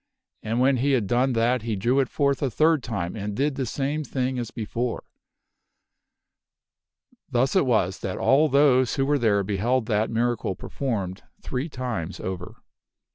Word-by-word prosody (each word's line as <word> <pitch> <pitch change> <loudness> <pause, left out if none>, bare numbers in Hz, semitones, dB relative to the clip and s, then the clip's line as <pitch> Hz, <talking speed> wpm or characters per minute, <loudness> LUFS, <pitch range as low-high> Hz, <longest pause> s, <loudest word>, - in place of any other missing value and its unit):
And 115 +2 -2
when 130 +1 +4
he 140 +3 +1
had 120 -6 +2
done 125 +5 +1
that 120 +1 +2
he 110 -1 -2
drew 120 +8 +1
it 135 - +1
forth 140 -2 0
a 140 - +1
third 155 +5 +3
time 100 -7 -4
and 105 -1 -4
did 145 +4 +1
the 135 -2 -3
same 145 +5 -2
thing 130 -2 -2
as 120 -2 -4
before. 115 +2 -3 2.3
Thus 125 +6 +1
it 185 -8 +3
was 95 -6 +1
that 95 - -4
all 150 +4 +4
those 130 -3 +4
who 135 - +1
were 145 +1 +2
there 105 -4 +2
beheld 110 +5 0
that 110 0 0
miracle 115 -4 -1
performed 100 -8 -4 0.2
three 135 +5 -3
times 115 - -4
over. 90 -1 -5
125 Hz, 165 wpm, -25 LUFS, 110-135 Hz, 2.3 s, when